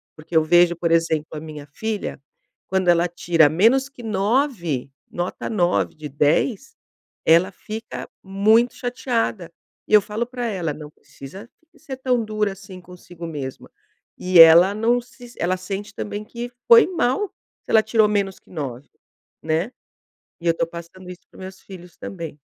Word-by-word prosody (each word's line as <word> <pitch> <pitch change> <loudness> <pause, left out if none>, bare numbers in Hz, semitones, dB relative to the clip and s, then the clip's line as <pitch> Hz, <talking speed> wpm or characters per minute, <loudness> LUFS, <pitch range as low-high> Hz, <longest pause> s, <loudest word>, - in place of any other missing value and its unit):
Porque 155 +2 -3
eu 160 - +5
vejo, 175 +2 +4
por 170 0 -1
exemplo, 165 -2 +2
a 155 - -5
minha 150 -2 -9
filha, 210 +4 -5 0.5
quando 190 -1 0
ela 175 0 +4
tira 170 -2 +3
menos 230 - +3
que 275 -3 -14
9, 200 - -1 0.2
nota 175 +1 -4
9 175 - +1
de 155 -1 -7
10, 165 - 0 0.5
ela 170 +4 +4
fica 220 +3 -8
muito 215 +5 +3
chateada 235 -7 -2 0.4
e - - -5
eu 210 - +8
falo 215 +4 -3
para 245 0 -5
ela: 180 -7 -2
"Não 150 0 -10
precisa 190 - -13 0.3
ser 290 -4 -8
tão 255 -3 0
dura 215 -1 -1
assim 195 -1 -12
consigo 175 -1 -11
mesmo". 140 -5 -7 0.5
E 180 -1 +3
ela 165 +4 +9
não 230 +3 +1
se 245 0 -15
ela 185 +2 0
sente 195 +3 -6
também 205 0 -5
que 235 +2 -7 0.2
foi 465 -2 +8
mal 360 +2 0 0.3
se - - -8
ela 220 - +6
tirou 220 -1 +3
menos 200 -2 -1
que - - -28
9, 140 -6 -6 0.6
né. 160 +8 -1 0.7
E - - -10
eu - - +6
estou 165 0 -2
passando 170 +2 -11
isso 180 -1 -10
para - - -19
os - - -12
meus 190 0 -10
filhos 180 -2 -13
também. 165 -5 -7
185 Hz, 165 wpm, -22 LUFS, 165-225 Hz, 0.7 s, ela